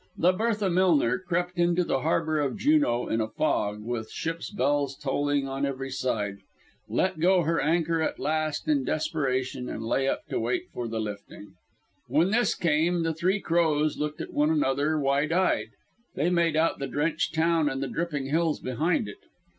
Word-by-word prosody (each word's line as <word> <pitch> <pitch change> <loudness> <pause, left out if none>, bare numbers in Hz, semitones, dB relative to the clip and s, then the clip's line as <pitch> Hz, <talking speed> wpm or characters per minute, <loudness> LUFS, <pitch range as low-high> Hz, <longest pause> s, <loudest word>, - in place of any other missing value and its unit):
The 175 +2 +4
Bertha 210 0 0
Millner 165 -9 +3
crept 180 0 -2
into 175 +1 +3
the 135 - 0
harbour 160 +1 0
of 140 -3 -1
Juneau 290 - +2
in 115 - 0
a 110 - -1
fog, 105 -5 -1
with 110 -1 -4
ships' 165 +1 -4
bells 145 -6 0
tolling 145 -1 0
on 135 +1 -3
every 135 -1 -3
side, 110 -7 -2 0.5
let - - 0
go 180 +2 +4
her 165 +2 +1
anchor 165 +1 +1
at - - -1
last 155 - -1
in 295 -3 +2
desperation 135 - -1
and 110 - -5
lay 135 +4 +1
up 300 - -1
to - - -1
wait 365 -1 -1
for 120 - -4
the 115 0 -3
lifting. 105 -1 -7 0.5
When 155 +9 +2
this 240 +2 +2
came 170 +1 +1
the 165 0 0
Three 185 +5 0
Crows 155 -4 +1
looked 150 0 -3
at - - -7
one 150 +1 +2
another 150 0 +1
wide 140 +2 +1
eyed. 185 +2 +1 0.5
They 160 +6 +1
made 170 -2 +2
out 160 +1 +2
the 140 - -3
drenched 155 +2 -1
town 160 -1 +2
and 135 -1 -3
the - - -2
dripping 150 -3 -3
hills 160 +3 0
behind 140 0 0
it. 105 - -10
155 Hz, 180 wpm, -27 LUFS, 135-170 Hz, 0.5 s, The